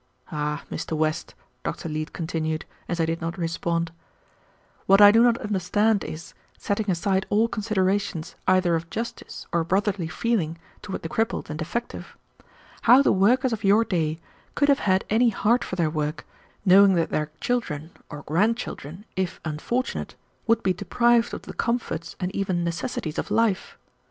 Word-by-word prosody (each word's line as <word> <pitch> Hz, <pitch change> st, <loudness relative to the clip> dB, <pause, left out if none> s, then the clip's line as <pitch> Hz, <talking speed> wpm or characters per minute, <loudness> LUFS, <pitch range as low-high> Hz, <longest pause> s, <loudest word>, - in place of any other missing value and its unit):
"Ah, 150 Hz, -1 st, -2 dB
Mr. 160 Hz, -, -3 dB
West," 155 Hz, +1 st, -1 dB, 0.3 s
Dr. -, -, -4 dB
Leete 155 Hz, 0 st, -4 dB
continued, 160 Hz, -2 st, -3 dB, 0.2 s
as 175 Hz, -, -2 dB
I 165 Hz, -, +3 dB
did 165 Hz, +1 st, -2 dB
not 165 Hz, +2 st, -3 dB
respond, 170 Hz, -1 st, -1 dB, 1.0 s
"what 195 Hz, +1 st, +6 dB
I 205 Hz, 0 st, +10 dB
do 225 Hz, +2 st, +5 dB
not 235 Hz, -1 st, +4 dB
understand 205 Hz, +1 st, +1 dB
is, 155 Hz, +2 st, -8 dB, 0.2 s
setting 205 Hz, +1 st, -2 dB
aside 190 Hz, +2 st, 0 dB
all 215 Hz, +3 st, +3 dB
considerations 200 Hz, -6 st, -1 dB
either 185 Hz, -2 st, +4 dB
of 165 Hz, 0 st, -4 dB
justice 230 Hz, +5 st, -6 dB
or 170 Hz, -1 st, +1 dB
brotherly 190 Hz, 0 st, 0 dB
feeling 165 Hz, -1 st, -1 dB, 0.2 s
toward 190 Hz, -, -6 dB
the -, -, -2 dB
crippled 220 Hz, -1 st, -2 dB
and 150 Hz, -, -5 dB
defective, 235 Hz, +9 st, -5 dB, 0.6 s
how 250 Hz, +4 st, +7 dB
the -, -, +4 dB
workers 240 Hz, +6 st, +3 dB
of 220 Hz, -1 st, -4 dB
your 205 Hz, +3 st, +4 dB
day 160 Hz, -5 st, -1 dB, 0.4 s
could 285 Hz, 0 st, +2 dB
have 280 Hz, 0 st, +4 dB
had 190 Hz, 0 st, +3 dB
any 235 Hz, +2 st, +4 dB
heart 235 Hz, +2 st, +2 dB
for -, -, -5 dB
their 165 Hz, -4 st, +1 dB
work, 150 Hz, -1 st, -3 dB, 0.4 s
knowing 195 Hz, +1 st, +7 dB
that 165 Hz, -1 st, 0 dB
their 150 Hz, 0 st, -1 dB
children, 170 Hz, -11 st, -2 dB, 0.2 s
or 145 Hz, -2 st, -8 dB
grand 210 Hz, +10 st, +2 dB
children, 180 Hz, -, -7 dB
if 185 Hz, -1 st, -2 dB
unfortunate, 160 Hz, +12 st, -3 dB, 0.3 s
would 230 Hz, 0 st, +3 dB
be 185 Hz, -, +2 dB
deprived 235 Hz, +6 st, +2 dB
of -, -, -6 dB
the -, -, -8 dB
comforts 235 Hz, -8 st, -2 dB
and 185 Hz, +1 st, -3 dB
even 185 Hz, -3 st, 0 dB
necessities 170 Hz, -1 st, -3 dB
of -, -, -4 dB
life. 225 Hz, -5 st, 0 dB
185 Hz, 165 wpm, -25 LUFS, 165-220 Hz, 1.0 s, I